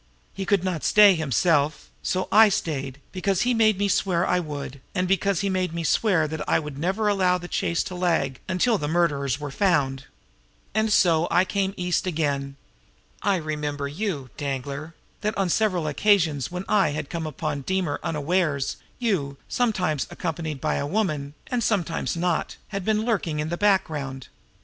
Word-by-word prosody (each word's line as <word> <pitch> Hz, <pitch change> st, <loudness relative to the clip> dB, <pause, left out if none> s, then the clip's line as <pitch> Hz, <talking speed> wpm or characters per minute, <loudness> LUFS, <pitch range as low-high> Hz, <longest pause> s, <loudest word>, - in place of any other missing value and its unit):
He 195 Hz, -1 st, -5 dB
could 200 Hz, -2 st, +2 dB
not 180 Hz, -5 st, -2 dB
stay 210 Hz, -2 st, +7 dB
himself; 155 Hz, -1 st, +1 dB
and -, -, -6 dB
so 185 Hz, 0 st, 0 dB
I 220 Hz, 0 st, +8 dB
stayed 140 Hz, -, -2 dB
because 195 Hz, 0 st, 0 dB
he 250 Hz, 0 st, +2 dB
made 220 Hz, -3 st, +4 dB
me 200 Hz, +1 st, +1 dB
swear 185 Hz, -3 st, +1 dB
I 180 Hz, -, +2 dB
would, 145 Hz, -4 st, -6 dB
and 185 Hz, -1 st, +1 dB
because 195 Hz, 0 st, +1 dB
he 200 Hz, -, 0 dB
made 185 Hz, -3 st, -1 dB
me 170 Hz, -, -2 dB
swear 165 Hz, -2 st, +2 dB
that 155 Hz, 0 st, -5 dB
I -, -, +4 dB
would 150 Hz, -3 st, -5 dB
never 190 Hz, +6 st, 0 dB
allow 185 Hz, -3 st, +3 dB
the 175 Hz, 0 st, -8 dB
chase 170 Hz, -1 st, 0 dB
to -, -, -7 dB
lag 165 Hz, -7 st, 0 dB
until 200 Hz, +4 st, +2 dB
the 145 Hz, -, -2 dB
murderers 145 Hz, -5 st, +1 dB
were 145 Hz, -2 st, -5 dB
found. 140 Hz, -7 st, +1 dB, 0.7 s
"And 220 Hz, +1 st, +1 dB
so 170 Hz, -4 st, +4 dB
I 180 Hz, +2 st, +4 dB
came 195 Hz, 0 st, -1 dB
East 180 Hz, +1 st, 0 dB
again. 140 Hz, -5 st, -1 dB, 0.7 s
I 200 Hz, -1 st, +2 dB
remembered 150 Hz, -3 st, -3 dB
you, 155 Hz, -, -3 dB
Danglar 140 Hz, +3 st, -4 dB, 0.3 s
that 215 Hz, +1 st, -1 dB
on 195 Hz, -2 st, +1 dB
several 185 Hz, -4 st, +1 dB
occasions 160 Hz, -3 st, +2 dB
when 180 Hz, +1 st, -4 dB
I 195 Hz, -8 st, +3 dB
had 155 Hz, -1 st, -5 dB
come 165 Hz, -2 st, -3 dB
upon 150 Hz, -1 st, -3 dB
Deemer 180 Hz, -1 st, -1 dB
unawares, 150 Hz, -2 st, 0 dB, 0.2 s
you, 170 Hz, -, -1 dB
sometimes 185 Hz, -, 0 dB
accompanied 160 Hz, -4 st, -4 dB
by 155 Hz, +2 st, 0 dB
a 140 Hz, -, -2 dB
woman, 150 Hz, -7 st, -1 dB
and 245 Hz, -2 st, -1 dB
sometimes 175 Hz, -6 st, 0 dB
not, 175 Hz, -1 st, -1 dB
had 195 Hz, -2 st, -4 dB
been 215 Hz, +2 st, +1 dB
lurking 180 Hz, -10 st, 0 dB
in 150 Hz, +1 st, -2 dB
the 170 Hz, -, -1 dB
background. 150 Hz, -10 st, 0 dB
170 Hz, 175 wpm, -25 LUFS, 150-195 Hz, 0.7 s, I